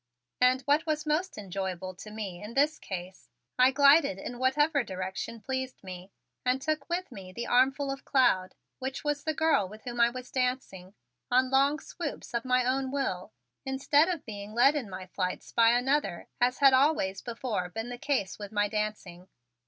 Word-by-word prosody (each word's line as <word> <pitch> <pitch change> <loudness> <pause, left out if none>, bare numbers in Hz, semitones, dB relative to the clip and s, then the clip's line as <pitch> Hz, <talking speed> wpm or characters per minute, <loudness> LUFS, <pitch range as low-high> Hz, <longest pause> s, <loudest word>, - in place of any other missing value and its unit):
And, 255 +1 +4
what 295 +5 +2
was 305 -1 -1
most 305 +5 -1
enjoyable 190 -2 -4
to 195 +4 -11
me 205 -5 -6
in 210 +3 -8
this 290 +3 +2
case, 185 -1 -7 0.3
I 255 +1 +7
glided 280 - +5
in 240 +5 -7
whatever 280 +2 +2
direction 190 +3 -5
pleased 260 +3 -4
me 185 0 -9 0.3
and 250 +1 +1
took 305 +2 -2
with 350 -2 -2
me 190 -5 -9
the 235 +6 -5
armful 270 +3 +2
of 275 0 -6
cloud, 220 -9 +2 0.2
which 265 +1 -4
was 295 -1 -1
the 315 -1 -1
girl 290 -12 +2
with 215 +2 -12
whom 240 -1 -2
I 235 - +6
was 255 +1 -8
dancing, 250 -8 -2 0.3
on 255 +1 +3
long 275 +2 +4
swoops 305 -6 -6
of 235 +1 -1
my 250 -1 +2
own 260 +1 0
will, 260 -10 -2 0.3
instead 285 +4 +2
of 345 -5 -3
being 205 -1 -7
led 260 +4 +6
in 255 -8 -3
my 185 0 -7
flights 185 0 -4
by 230 -1 +5
another 245 -4 +1
as 250 +1 +3
had 275 -2 +6
always 260 -9 +2
before 230 -6 -3
been 225 +5 -5
the 245 0 -7
case 250 -11 -1
with 205 -1 -7
my 205 -1 +1
dancing. 205 -4 -4
250 Hz, 185 wpm, -29 LUFS, 200-275 Hz, 0.3 s, I